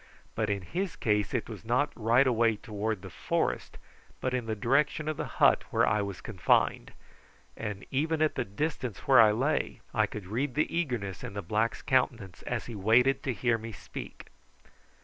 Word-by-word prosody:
But 110 -1 -1
in 100 -2 -1
his 180 - -3
case 105 -3 0
it 120 - -1
was 110 -5 -8
not 125 +6 +1
right 120 +4 +4
away 115 -3 +3
toward 105 -2 -4
the - - -8
forest, - - -2 0.4
but 130 - -2
in 125 -3 -2
the 110 - -1
direction 140 +7 +1
of 155 - -1
the - - -4
hut - - +5
where - - +3
I 105 0 +2
was 100 -2 -5
confined, 95 -7 +1 0.6
and 105 -3 -5
even 155 +4 0
at 155 -1 +2
the 130 - -1
distance 125 - -3
where 130 -4 +8
I 110 -2 +6
lay 130 +8 0
I - - +2
could 105 -3 -7
read 120 +7 -2
the 155 +2 0
eagerness 120 - -2
in 100 - -6
the 100 - -4
black's 110 +6 -1
countenance 115 -8 0
as 120 -2 -2
he 120 - -7
waited 115 +6 +3
to 135 - -1
hear 120 -1 +1
me 115 +1 -7
speak. - - -9
115 Hz, 190 wpm, -29 LUFS, 105-130 Hz, 0.6 s, where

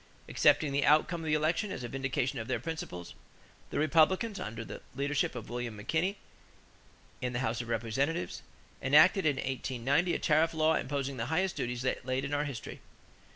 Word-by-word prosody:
Accepting 150 -3 +3
the 140 0 +1
outcome 155 +3 +3
of 160 - -5
the 155 - +3
election 165 +7 0
as - - -5
a - - -3
vindication 130 0 -2
of 110 - -5
their 125 -2 -1
principles, 120 - -6 0.6
the - - -4
Republicans, 165 +8 +3
under 115 +1 -5
the - - -8
leadership 140 0 0
of 120 - -6
William 120 -1 -4
McKinley 165 - -1 1.0
in 125 -1 -2
the 120 - -1
House 115 +1 -1
of 120 - -8
Representatives, 115 - -1 0.4
enacted 155 +6 +5
in 145 - +2
1890 130 +6 0
a - - +1
tariff 160 +1 +2
law 160 0 +3
imposing 140 -1 -2
the 115 0 -2
highest 180 +5 0
duties 120 0 -3
yet 130 - -1
laid 130 +1 -1
in 140 - -4
our 145 +1 +1
history. 135 -6 -6
140 Hz, 180 wpm, -31 LUFS, 120-160 Hz, 1.0 s, enacted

